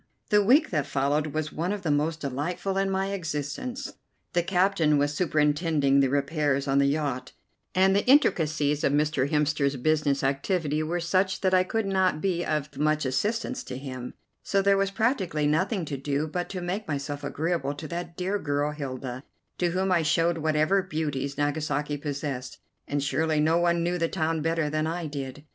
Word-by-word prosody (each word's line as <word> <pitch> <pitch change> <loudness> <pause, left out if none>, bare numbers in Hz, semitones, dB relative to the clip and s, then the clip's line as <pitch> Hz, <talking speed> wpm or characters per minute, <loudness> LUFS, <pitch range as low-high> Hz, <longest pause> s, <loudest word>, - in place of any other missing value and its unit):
The 210 0 +5
week 275 +9 +4
that 145 -5 0
followed 145 +3 +1
was 155 0 -3
one 170 +4 -1
of 205 -2 -4
the 160 - +1
most 155 +2 0
delightful 150 +8 -2
in 195 0 +1
my 195 0 -1
existence. 170 - -4 0.4
The 175 - +3
captain 175 -4 +2
was 145 +1 +1
superintending 150 -3 +2
the 135 -1 +3
repairs 140 0 0
on 135 0 +3
the 140 - +4
yacht, 140 -3 -2 0.4
and 190 +1 +4
the 200 - +3
intricacies 155 - +3
of 140 - +2
Mr. 145 -2 +1
Hemster's 150 -2 +1
business 145 +1 +1
activity 150 +3 0
were 165 +3 -1
such 185 +3 +1
that 190 -1 +2
I 185 0 +5
could 225 +3 -1
not 190 -4 +1
be 175 -1 0
of 150 -3 -3
much 155 0 +1
assistance 215 - -1
to 125 - -6
him; 130 -2 -7 0.3
so 200 - 0
there 200 0 +4
was 195 0 +1
practically 195 - 0
nothing 170 +5 +1
to 140 -2 -4
do 140 +2 -1
but 175 +3 -3
to 185 -2 -5
make 190 +4 -3
myself 145 0 -3
agreeable 145 -1 -1
to 155 +2 -7
that 170 0 -5
dear 190 +3 -1
girl, 145 -2 -1
Hilda, 130 -3 -5 0.4
to 175 - +2
whom 185 +2 0
I 175 -2 +4
showed 165 +2 +2
whatever 155 +5 +2
beauties 150 -6 -3
Nagasaki 145 0 -1
possessed, 140 -3 -4 0.3
and 145 -1 -1
surely 155 +3 +1
no 160 +3 +3
one 170 -1 +2
knew 175 +1 0
the 165 0 +1
town 160 -2 -1
better 165 0 0
than 155 +1 -1
I 170 +1 -3
did. 145 -1 -6
155 Hz, 185 wpm, -27 LUFS, 145-180 Hz, 0.4 s, The